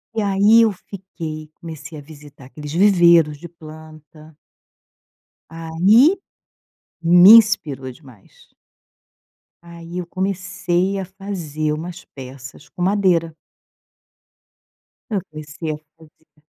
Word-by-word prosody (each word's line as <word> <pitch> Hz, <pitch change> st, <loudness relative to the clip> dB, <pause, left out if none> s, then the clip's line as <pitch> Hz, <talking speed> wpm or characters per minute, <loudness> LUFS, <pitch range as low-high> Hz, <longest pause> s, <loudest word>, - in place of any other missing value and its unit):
E 220 Hz, -, -1 dB
aí 205 Hz, +3 st, +4 dB
eu 225 Hz, -2 st, +3 dB
fiquei, 170 Hz, -5 st, -9 dB
comecei 155 Hz, -1 st, -10 dB
a -, -, -9 dB
visitar 145 Hz, -2 st, -15 dB
aqueles 150 Hz, +2 st, -10 dB
viveiros 170 Hz, -5 st, +4 dB
de 170 Hz, +3 st, -11 dB
planta. 155 Hz, -1 st, -15 dB, 1.1 s
Aí, 185 Hz, -, +3 dB, 0.8 s
me 175 Hz, +4 st, +7 dB
inspirou 165 Hz, -, +3 dB
demais. 125 Hz, -7 st, -20 dB, 1.2 s
Aí 170 Hz, +1 st, -10 dB
eu 180 Hz, -, -4 dB
comecei 185 Hz, 0 st, -2 dB
a 190 Hz, -, -5 dB
fazer 175 Hz, -6 st, -5 dB
umas 170 Hz, +4 st, -8 dB
peças 130 Hz, 0 st, -12 dB
com 180 Hz, -, -10 dB
madeira. 180 Hz, -4 st, +1 dB, 1.7 s
Eu 200 Hz, -4 st, -2 dB
comecei 155 Hz, +1 st, -7 dB
a 150 Hz, -, -5 dB, 0.2 s
fazer 160 Hz, -1 st, -24 dB
165 Hz, 100 wpm, -19 LUFS, 155-190 Hz, 1.7 s, me